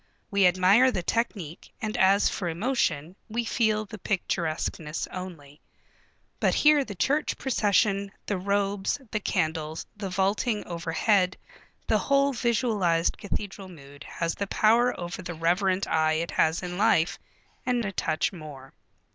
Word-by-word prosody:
We 200 -2 +5
admire 185 +8 +5
the 185 -8 -2
technique, 190 -7 -3
and 220 -1 -3
as 200 -2 +4
for 180 -4 -2
emotion, 170 - -1
we 235 +2 -2
feel 215 -2 +1
the 215 +1 -10
picturesqueness 165 -4 -2
only. 160 -6 -9 0.8
But - - +2
here 300 -1 +5
the 210 -6 -8
church 285 - 0
procession, 200 -5 +1
the 200 -3 -2
robes, 200 +3 0
the 215 - 0
candles, 160 -5 -2
the 205 -2 -5
vaulting 200 +4 0
overhead, 180 +3 +1 0.5
the - - +2
whole 275 0 +2
visualized 215 -9 +1
cathedral 200 -1 -5
mood 140 -5 -13
has 165 -1 -2
the 200 - -4
power 235 +5 +3
over 175 +1 -5
the 175 -1 -6
reverent 185 +4 +1
eye 155 0 +2
it 165 +2 -2
has 160 +3 +1
in 180 +1 -5
life, 170 -4 +3 0.4
and 245 -3 0
a 195 - -2
touch 155 -1 -1
more. 145 -6 -10
190 Hz, 140 wpm, -27 LUFS, 170-215 Hz, 0.8 s, We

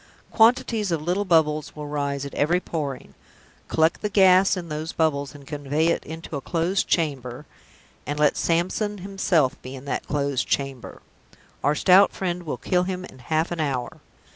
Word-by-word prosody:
Quantities 225 -3 +3
of 165 - +1
little 180 +6 -1
bubbles 155 -4 +2
will 150 -1 -6
rise 140 -1 -2
at 140 - -8
every 170 +5 +2
pouring; 145 -7 -5 0.5
collect 160 +1 +2
the 210 - -1
gas 190 -1 +5
in 175 -2 -5
those 155 +1 -5
bubbles, 145 -3 0
and 140 -1 -13
convey 150 +3 -1
it - - 0
into 160 0 -7
a 140 - -3
closed 175 +6 0
chamber 140 -4 -1 0.6
and 145 - -2
let 150 -1 +3
Samson 185 +5 0
himself 185 -7 0
be 130 +1 -8
in 130 +1 -10
that 140 - -3
closed 140 -3 -1
chamber; 135 -3 -3 0.6
our 145 +2 +2
stout 190 +4 +5
Friend 180 -2 -3
will - - -2
kill 180 -1 +1
him 185 0 -4
in 130 - -14
half 155 +7 -1
an 175 - -3
hour! 135 -5 -2
160 Hz, 170 wpm, -24 LUFS, 140-180 Hz, 0.6 s, gas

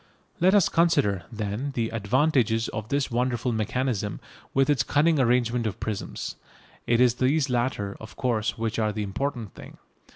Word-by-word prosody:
Let 185 +4 +4
us 200 -5 +5
consider, 105 - +2
then, 110 +5 -3
the 115 -2 0
advantages 115 +1 +1
of 110 +1 -6
this 140 -2 0
wonderful 125 0 0
mechanism, 110 -1 -1 0.3
with 135 0 +2
its 145 -5 +3
cunning 150 +6 +2
arrangement 120 -2 +2
of 105 +1 -5
prisms. 110 -3 -4 0.5
It 115 0 +3
is 125 -2 +5
these 135 +2 +1
latter, 120 -5 -1
of 110 - -11
course, 115 -4 -1
which 115 0 -2
are 110 -1 +1
the 105 +1 -3
important 115 +1 -3
thing. - - -12
120 Hz, 160 wpm, -26 LUFS, 110-135 Hz, 0.5 s, us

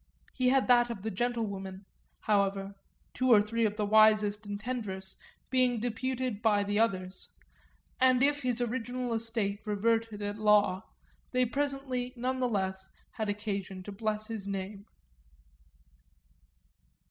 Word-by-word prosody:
He 255 -1 +2
had 270 0 +3
that 240 -1 +5
of 215 -5 -6
the 220 - -2
gentlewomen, 200 -4 -3 0.4
however, 200 -1 +1 0.4
two 255 0 +1
or 220 - +9
three 225 +2 +1
of 210 0 -5
the 210 - 0
wisest 215 0 +4
and 205 0 -4
tenderest 205 -6 -4 0.4
being 250 -2 +3
deputed 245 0 -2
by 210 -3 +3
the 205 +1 0
others; 190 -4 -1 0.7
and 255 0 +5
if 290 +1 +2
his 250 -2 -1
original 245 0 -2
estate 225 -3 -2
reverted 220 0 0
at 205 +1 -4
law 210 -3 +4 0.5
they 255 0 +3
presently 270 -1 -2
none 255 +2 -2
the 250 -1 +1
less 190 -3 -2 0.2
had 220 -3 -3
occasion 200 -2 -4
to 205 - -7
bless 215 +1 -2
his 220 -3 -5
name. 200 +1 -5
220 Hz, 135 wpm, -30 LUFS, 205-245 Hz, 0.7 s, or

